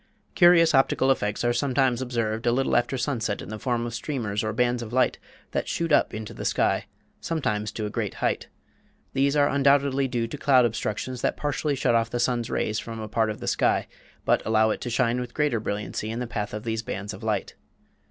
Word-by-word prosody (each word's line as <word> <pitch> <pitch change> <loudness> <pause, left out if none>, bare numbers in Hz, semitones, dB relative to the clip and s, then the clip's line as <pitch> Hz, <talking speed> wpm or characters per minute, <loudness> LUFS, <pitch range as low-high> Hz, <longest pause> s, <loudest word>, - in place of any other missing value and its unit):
Curious 175 -2 +6
optical 135 0 +3
effects 105 -5 -1
are 120 0 +2
sometimes 130 -2 +1
observed 115 -3 -2
a - - +5
little 135 +2 +1
after 120 +2 +1
sunset 120 -5 -1
in - - -8
the 110 0 -6
form 120 -1 -1
of 120 - -5
streamers 115 -4 -2
or 110 - -1
bands 120 +2 +1
of 115 -2 -7
light 125 0 +2 0.3
that - - -2
shoot 165 -1 -2
up - - +4
into 110 0 -6
the - - -7
sky, - - +1 0.3
sometimes 105 -10 -2
to 110 - -3
a 105 - -4
great - - -3
height. - - -1 0.7
These 140 +1 +2
are 145 -1 +4
undoubtedly 140 -1 +3
due 120 -2 -1
to 115 - -6
cloud 130 -3 +5
obstructions 120 +2 -3
that - - 0
partially 145 0 -1
shut 130 -2 +1
off 115 -1 +2
the 120 - -3
sun's 120 -1 0
rays 110 +1 -1
from 115 -1 -7
a 110 - -5
part 110 +1 +1
of 105 - -5
the - - -5
sky, - - +1 0.4
but - - +3
allow 110 0 +3
it - - -3
to 120 - -3
shine 120 0 +1
with 125 -1 -6
greater 150 -6 +1
brilliancy 105 0 -3
in 115 - -4
the 125 - -2
path 105 -3 -4
of 105 - -6
these 110 -1 -2
bands 100 -1 -5
of 95 - -10
light. 110 -1 -2
120 Hz, 220 wpm, -25 LUFS, 110-135 Hz, 0.7 s, Curious